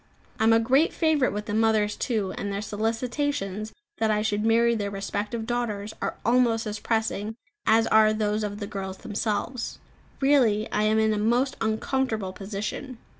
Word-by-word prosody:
I 220 - +3
am 225 - +6
a 225 - +6
great 265 +8 +3
favourite 310 -5 +2
with 210 +1 -4
the 210 - -4
mothers 215 -1 +2
too; 215 -7 -1
and 200 - -4
their 200 - -2
solicitations 225 0 -2 0.3
that 220 -1 +2
I 210 0 +1
should 210 -1 0
marry 230 +1 +4
their 205 -3 -2
respective 205 +3 -3
daughters 220 -3 -2
are - - -2
almost 235 -2 +3
as 210 0 -4
pressing 220 -1 -1 0.3
as 225 +1 +5
are 215 -1 +5
those 215 0 0
of 205 0 -4
the 205 - -3
girls 190 -1 -5
themselves. 220 +4 -3 0.4
Really 250 -7 +3
I 210 - +1
am 215 +1 +3
in 220 0 +3
a 210 - -1
most 245 +5 +1
uncomfortable 220 -2 -1
position. 210 +6 -5
220 Hz, 175 wpm, -26 LUFS, 210-235 Hz, 0.4 s, am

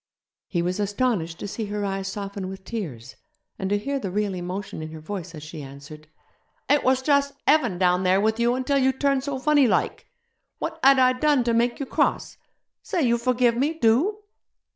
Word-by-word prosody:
He 170 -3 -1
was 180 +3 -2
astonished 205 -5 -1
to - - -4
see 215 +2 -4
her 205 0 -3
eyes 195 0 -3
soften 200 -1 -5
with 190 0 -9
tears, 145 - -6 0.4
and 190 -2 -2
to 205 - +2
hear 275 +7 -2
the 200 - -4
real 205 +1 -1
emotion 180 0 -5
in 155 0 -6
her 160 - -8
voice 175 0 -6
as 150 - -9
she 155 0 -8
answered, 140 +3 -11 0.6
'It 290 0 +3
was 260 0 +2
just 280 0 +2
heaven 250 - +3
down 180 0 +3
there 185 +1 +3
with 220 +2 +1
you 240 +1 +2
until 265 +2 +1
you 265 0 +3
turned 275 0 +1
so 280 -1 -3
funny 290 0 +4
like. - - 0 0.5
What - - -4
had 275 0 +7
I 255 -1 +5
done 285 0 +2
to 235 -1 0
make 235 +1 +1
you 280 - -2
cross? - - 0 0.4
Say 355 -6 -1
you 235 -2 +2
forgive 245 -1 +2
me, 285 +6 0
do!' 325 - +2
220 Hz, 200 wpm, -24 LUFS, 185-260 Hz, 0.6 s, had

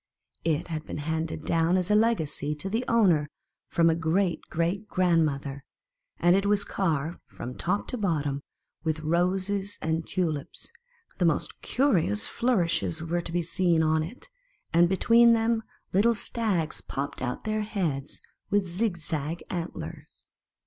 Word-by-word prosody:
It 165 +1 0
had 155 -2 -3
been - - -5
hand 160 +2 -2
ed 155 - -6
down 165 +2 +2
as 185 +2 0
a - - +5
legacy 160 -10 +1
to 190 +6 -3
the 225 +3 0
o 230 -1 +4
wner 155 -6 +4 0.4
from 165 -1 +3
a 165 - +5
great 165 +1 +1
great 175 +5 -1
grandmother, 155 -7 +1 0.5
and 175 +1 +4
it 195 +1 +2
was 205 0 +3
carved 165 -3 -1
from 125 - -7
top 200 +4 -1
to 250 - -3
bottom 150 -8 0 0.4
with 160 -1 -1
roses 190 +5 0
and 160 0 -1
tulips; 160 -6 -2 0.5
the 180 - +3
most 165 -3 0
curious 170 - +2
flourishes 175 -8 +1
105 165 - -7
mti - - +1
were 175 - +1
to 170 - -6
be 175 0 0
seen 170 0 +2
on 155 0 +3
it, 170 +11 -7 0.5
and 170 +1 +5
between 230 +5 +6
them 225 0 +2 0.3
little 225 +5 +4
stags 205 -9 -1
popped 140 +1 -4
out 125 -1 -3
their 215 0 -1
heads 170 -10 -2 0.3
with 205 -1 +2
zig 185 +2 -1
zag 155 0 -3
antlers. 175 -2 -6
170 Hz, 160 wpm, -27 LUFS, 160-200 Hz, 0.5 s, between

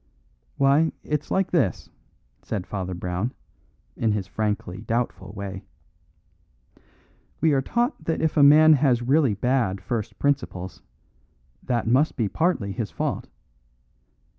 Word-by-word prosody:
"Why, 140 +4 +3
it's 150 -1 -3
like 190 -1 0
this," 135 - 0 0.5
said 100 -4 -4
Father 95 -2 -4
Brown, 90 +7 -3 0.6
in 110 -2 +1
his 100 -2 -2
frankly 105 -3 -3
doubtful 115 -5 -2
way: 100 -2 -6 1.8
"We 160 -2 +3
are 135 - +3
taught 240 - -1
that 165 - -1
if 160 -1 0
a 150 - +4
man 155 +2 +8
has 130 -4 +2
really 135 -3 +3
bad 120 -4 0
first 105 +3 -4
principles, 125 -10 -2 0.8
that 120 -3 -1
must 130 +7 +2
be 115 - +1
partly 160 - 0
his 105 +1 -3
fault. - - -3
120 Hz, 125 wpm, -24 LUFS, 100-150 Hz, 1.8 s, man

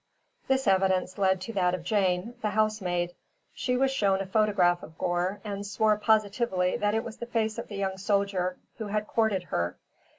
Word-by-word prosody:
This 265 0 +2
evidence 190 -1 +2
led 190 -1 +3
to 230 +5 -6
that 180 -3 +2
of 175 - -8
Jane, 190 +2 +1
the 215 - 0
housemaid. 190 -5 0 0.4
She 250 -1 -1
was 270 +1 +2
shown 200 -7 +2
a 195 - -2
photograph 190 -3 +2
of 160 - -12
Gore 180 +3 -1
and 200 -2 -4
swore 215 +1 +2
positively 210 -3 +1
that 205 +1 +1
it 225 - 0
was 230 -1 -8
the 235 - -6
face 220 -2 -1
of - - -6
the 205 - -7
young 190 -1 -2
soldier 195 -3 0 0.2
who 220 - -4
had 210 +1 -1
courted 215 -5 +1
her. 85 +1 -1
200 Hz, 190 wpm, -28 LUFS, 185-215 Hz, 0.4 s, led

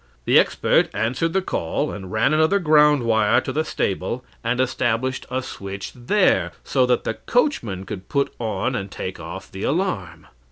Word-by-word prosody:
The - - +6
expert - - +2
answered 130 +9 0
the 190 0 +1
call, 140 - -2
and 95 -2 -8
ran 110 +7 +2
another 160 +5 +4
ground 150 -5 +4
wire 110 -2 +3
to 130 - -4
the 155 +3 +1
stable, 105 +1 -2 0.2
and 120 +2 0
established 130 0 0
a 130 0 -2
switch 100 -5 -7
there, 180 +12 +2
so 130 -2 +2
that 125 -1 +2
the - - -1
coachman 115 - -1
could 95 0 -8
put 140 0 0
on 115 +2 -1
and 100 -4 -3
take 95 -1 -6
off 85 +4 -8
the 95 - -8
alarm. 105 - -2
120 Hz, 170 wpm, -22 LUFS, 100-150 Hz, 0.2 s, The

